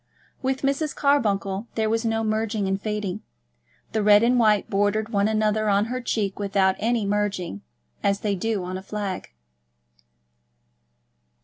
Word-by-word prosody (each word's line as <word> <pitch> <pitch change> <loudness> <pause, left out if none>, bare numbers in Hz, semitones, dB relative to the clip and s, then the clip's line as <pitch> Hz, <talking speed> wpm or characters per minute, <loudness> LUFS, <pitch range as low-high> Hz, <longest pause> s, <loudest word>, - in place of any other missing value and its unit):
With 265 +1 -1
Mrs. 280 +3 0
Carbuncle 210 -7 +1
there 220 -1 +1
was 225 +1 0
no 225 -1 0
merging 215 -1 -1
and 195 +1 -1
fading. 210 -3 -3 0.7
The 220 - 0
red 205 +1 +6
and 245 +1 +3
white 215 -3 +3
bordered 205 +2 0
one 200 -2 +2
another 215 0 +1
on 200 +1 +3
her 255 - -3
cheek 210 -5 -2
without 195 -1 +2
any 230 -1 +1
merging, 200 - -1 0.4
as 200 0 +1
they 210 -2 0
do 200 0 -1
on 185 +1 -4
a - - -10
flag. 195 -1 -4
210 Hz, 145 wpm, -24 LUFS, 200-225 Hz, 0.7 s, red